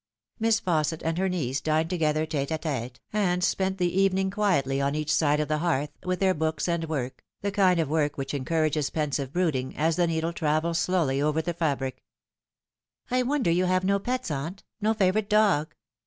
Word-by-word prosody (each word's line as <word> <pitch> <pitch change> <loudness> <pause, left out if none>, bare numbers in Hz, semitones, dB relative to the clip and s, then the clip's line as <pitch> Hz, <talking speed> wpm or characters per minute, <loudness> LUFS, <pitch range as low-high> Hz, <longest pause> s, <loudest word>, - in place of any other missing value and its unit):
Miss 225 -1 +3
Fausset 160 -4 0
and 165 +1 0
her 190 0 +1
niece 140 -7 -2
dined 160 +2 0
together 155 -3 +1
tete 145 -3 -2
d 160 - 0
tete, 125 -7 -4
and 180 -4 +1
spent 190 +2 0
the 180 +1 +1
evening 190 0 +2
quietly 160 -10 +1
on 140 +1 0
each 155 0 0
side 150 -2 +3
of 150 - 0
the 155 +1 0
hearth, 150 -4 0
with 185 0 -1
their 190 -1 +3
books 160 -1 -1
and 170 -1 0
work, 130 -5 -3 0.2
the 200 - -1
kind 190 -3 +3
of 160 - +1
work 150 -1 0
which 135 0 -4
encourages 155 +1 0
pensive 145 -3 -2
brooding, 150 -7 -1
as 160 +2 +1
the 175 -1 +3
needle 165 +1 -1
travels 160 +1 0
slowly 160 -8 +1
over 150 +1 +1
the 170 +2 -2
fabric. 140 -6 -2 0.6
" - - -36
I 255 0 +3
wonder 255 -7 +1
you 180 +2 +2
have 185 0 +1
no 200 +1 +2
pets, 250 -2 -2
aunt 155 +7 -4 0.2
no 220 +2 +2
favourite 200 +1 +1
dog." 205 -8 +3
165 Hz, 200 wpm, -27 LUFS, 150-185 Hz, 0.6 s, Miss